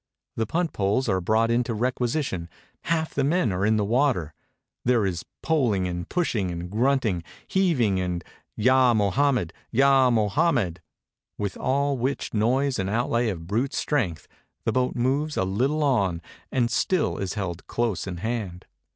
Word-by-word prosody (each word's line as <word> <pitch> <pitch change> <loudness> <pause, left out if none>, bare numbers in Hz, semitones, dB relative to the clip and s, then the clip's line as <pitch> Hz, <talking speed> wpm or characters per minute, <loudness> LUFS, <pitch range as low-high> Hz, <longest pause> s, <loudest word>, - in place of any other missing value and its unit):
The 110 -1 -1
punt 170 +5 -1
poles 105 +6 +1
are 95 -3 +1
brought 110 +5 +2
into 120 -1 0
requisition; 120 - -1 0.4
half 160 -1 0
the 140 - 0
men 150 -2 +2
d.re 95 +2 0
in 110 0 +3
the 105 - +1
water; 115 - +1 0.5
there 120 -4 +3
is 90 -4 -3 0.2
poling 120 - +1
and 85 -1 -5
pushing 115 - 0
and 85 +1 -5
grunting, 115 -6 +1 0.2
heaving, 135 - +2
and 90 -2 -2 0.3
"Yah 130 +1 +4
Mohajnmed, 110 - +2 0.2
Yah 135 +1 +4
Mohainmed," 110 - +1 0.6
with 100 -2 -3
all 140 0 0
which 130 +3 -2
noise 125 +5 +1
and 95 0 -1
outlay 115 +1 +1
of 85 -5 -5
brute 115 +9 -1
strength, 100 - -1 0.4
the - - +2
boat 130 0 0
moves 140 +5 0
a - - +2
little 130 +11 0
on 100 - +1 0.3
and 120 -2 +1
still 175 +8 +1
is 95 0 -3
held 90 -4 -4
close 115 -6 -1
in 90 -2 -4
hand. 100 -3 -4
115 Hz, 155 wpm, -25 LUFS, 95-135 Hz, 0.6 s, Yah